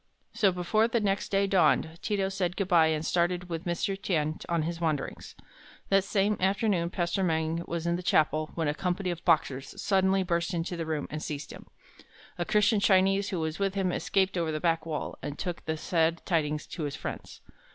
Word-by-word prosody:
So, 195 -3 +3
before 185 +5 +1
the 235 0 +1
next 200 -2 -1
day 200 0 +2
dawned, 170 -3 +2
Ti 210 - -1
to 195 0 0
said 180 -2 -2
good 195 - -1
by, 170 -4 +5
and 160 0 -1
started 180 +1 0
with 165 0 -4
Mr. 175 +3 -1
Tien 160 -5 -1
on 170 -2 +1
his 170 +1 -4
wanderings. 155 -4 -2 0.5
That 195 -1 +4
same 200 +1 +1
afternoon 190 -2 +1
Pastor 175 +2 -1
Meng 160 -1 0
was 170 0 -3
in 170 0 +1
the - - -5
chapel 155 -3 +2
when 165 -2 -1
a 145 - +1
company 180 +3 -1
of 170 -1 -6
Boxers 135 -3 +1
suddenly 190 -1 +2
burst 170 0 -1
into 170 +1 -2
the 165 -2 -4
room 155 -2 -2
and 155 0 -4
seized 145 -2 -5
him. - - -11 0.7
A 175 - 0
Christian 210 +2 +3
Chinese 195 0 +3
who 185 - -2
was 160 +2 -3
with 195 -1 0
him 190 -2 +1
escaped 190 0 0
over 165 -2 0
the 155 - -2
back 165 0 0
wall, 155 -2 -4
and 145 +1 -5
took 175 -2 -4
the 160 0 -2
sad 165 +1 0
tidings 155 -4 0
to 160 - -5
his 145 -1 -4
friends. - - -7
175 Hz, 205 wpm, -28 LUFS, 160-195 Hz, 0.7 s, by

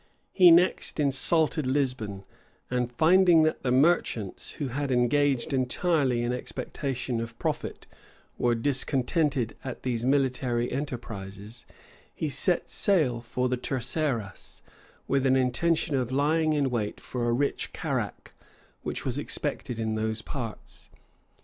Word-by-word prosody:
He 180 -3 +7
next 170 -1 +3
insulted 150 +1 +1
Lisbon; 125 -8 -1 0.5
and 125 -1 0
finding 170 +4 +5
that 155 - 0
the 130 - -1
merchants, 130 - +1
who 140 -3 -4
had 140 +2 -2
engaged 135 +2 +2
entirely 130 -1 +1
in 120 +1 0
expectation 125 -1 -3
of 115 0 -7
profit, - - -3 0.5
were 120 -1 +2
discontented 135 0 0
at 130 -3 -6
these 120 -3 -2
military 125 -3 +1
enterprises, 110 -6 -6 0.5
he 155 - -2
set 155 +6 +2
sail 150 - +2
for 125 +2 -2
the 125 0 -1
Terceras, 125 -4 -3 0.4
with 135 -1 +1
an 130 - +4
intention 145 +5 +1
of 130 -2 -1
lying 155 +3 +2
in 140 -3 +1
wait 110 -4 -2
for 120 -2 -3
a - - +2
rich 140 +4 -1
carrack, - - -4 0.5
which - - -5
was - - -2
expected 120 - -3
in 110 -1 -1
those 110 0 -2
parts. 115 -6 -7
130 Hz, 130 wpm, -27 LUFS, 120-145 Hz, 0.5 s, He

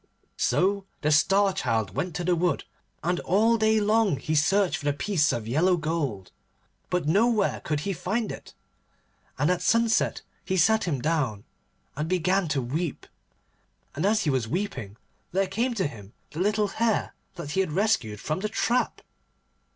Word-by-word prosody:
So 195 +1 +1
the 150 - +1
Star 195 +6 +4
Child 115 - -1
went 180 -3 -2
to 175 - -2
the 175 0 +2
wood, 175 +1 0 0.4
and 175 +1 0
all 220 +6 +3
day 220 -1 +3
long 210 -5 +2
he 155 - -3
searched 165 +2 +2
for 155 - -9
the 145 - +2
piece 155 0 +1
of 115 -2 -3
yellow 175 +9 +2
gold, 150 - -3 0.6
but 180 -4 -1
nowhere 210 +4 +2
could 150 -2 -1
he 195 +5 -2
find 215 +5 -2
it. - - -10 0.8
And 145 +6 +2
at 180 - 0
sunset 230 -1 +2 0.2
he 190 - -1
sat 220 +6 +3
him 145 -8 -1
down 140 -10 0 0.5
and 150 +3 -3
began 185 +1 +1
to 145 -4 -1
weep, 155 +6 -3 0.9
and 155 - -3
as 210 +2 +2
he 150 - +1
was 130 -4 0
weeping 115 - -4 0.4
there 195 +1 +2
came 235 +6 -1
to 195 - 0
him 105 -8 -8 0.2
the 155 - -7
little 210 +2 +1
Hare 225 +1 0 0.2
that 145 -4 -6
he 190 - 0
had 185 -5 +1
rescued 180 - 0
from 155 - -2
the 215 +2 -2
trap. 240 +3 0
180 Hz, 170 wpm, -26 LUFS, 150-205 Hz, 0.9 s, Star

